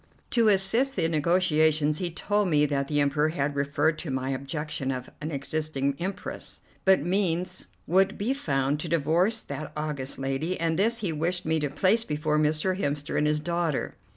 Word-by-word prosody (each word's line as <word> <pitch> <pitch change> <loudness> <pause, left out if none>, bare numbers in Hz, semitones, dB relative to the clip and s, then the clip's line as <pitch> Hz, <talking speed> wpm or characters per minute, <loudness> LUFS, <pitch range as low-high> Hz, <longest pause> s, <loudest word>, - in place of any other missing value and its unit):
To 230 -2 +4
assist 215 +7 +3
the 165 - +2
negotiations 155 -2 +2
he 180 - 0
told 205 +4 0
me 150 -2 +4
that 140 -2 -1
the 145 0 0
Emperor 145 +2 +2
had 145 -2 -2
referred 145 +3 +1
to 170 - -5
my 130 0 -2
objection 140 +1 -3
of 130 -1 -4
an 155 - -3
existing 140 -1 -2
Empress, 195 +3 -5 0.2
but 190 -6 +5
means 180 0 -1 0.2
would 190 +4 +2
be 225 +6 0
found 140 - 0
to 165 - -4
divorce 170 +8 +2
that 140 +2 -6
august 150 -3 -3
lady, 135 +7 -2
and 165 0 0
this 230 +3 +2
he 180 -6 -1
wished 175 +4 -1
me 160 0 +1
to 150 -1 -1
place 195 +10 +2
before 150 -3 0
Mr. 155 +5 +2
Hemster 145 -3 -2
and 150 - +2
his 150 0 +2
daughter. 170 -2 -1
155 Hz, 180 wpm, -27 LUFS, 145-185 Hz, 0.2 s, but